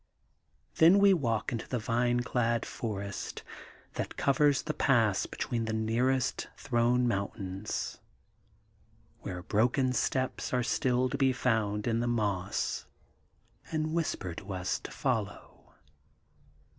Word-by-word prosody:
' - - -42
Then 170 +4 +8
we 200 -1 +6
walk 115 - 0
into 115 -2 -4
the 125 - -1
vine 120 +2 +1
clad 120 -2 0
forest 100 -3 -5 0.5
that - - -4
covers 140 0 +3
the 155 - -2
pass 115 -9 +2
between 115 -2 -2
the 110 - -2
nearest 120 +4 0
throne 120 -1 +2
mountains, 100 -2 -3 1.2
where 90 -5 -6
broken 125 +5 +2
steps 130 0 -1
are 125 - +2
still 125 +1 +1
to 140 +2 -4
be 135 -1 +4
found 110 -5 0
in 115 -1 +1
the 120 - 0
moss, 100 -6 -1 0.8
and 155 0 -1
whisper 155 - -1
to 95 +3 -7
us 90 0 -1
to - - -8
follow. - - -3
120 Hz, 125 wpm, -30 LUFS, 105-130 Hz, 1.2 s, Then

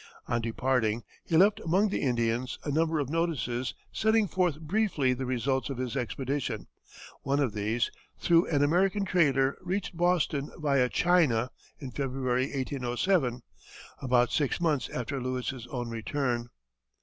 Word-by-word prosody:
On 120 0 0
departing, 115 -1 0 0.2
he 160 - +1
left 205 +4 +5
among 195 +3 +2
the - - -2
Indians 120 -1 0
a 145 - -2
number 160 +2 +1
of 145 -2 -2
notices 130 - -1 0.2
setting 220 -1 +3
forth 175 -4 0
briefly 160 -6 +1
the 130 0 -4
results 130 +2 0
of 135 - -4
his 125 0 -3
expedition; 130 -1 -2 0.6
one 140 +1 0
of 130 -7 +1
these, 110 +3 0 0.3
through 170 0 +4
an 145 -3 +2
American 190 +6 +2
trader, 140 -7 +2
reached 185 0 -3
Boston 170 -5 +1
via 140 -5 +2
China 145 -11 +2 0.3
in 135 -4 -7
February, 130 -1 -1
1807, 130 0 0 0.6
about 125 -2 +3
six 145 +1 0
months 150 -9 0
after 130 +2 -3
Lewis's 125 -1 -3
own 125 -2 -4
return. 120 +1 -2
135 Hz, 140 wpm, -29 LUFS, 125-165 Hz, 0.6 s, left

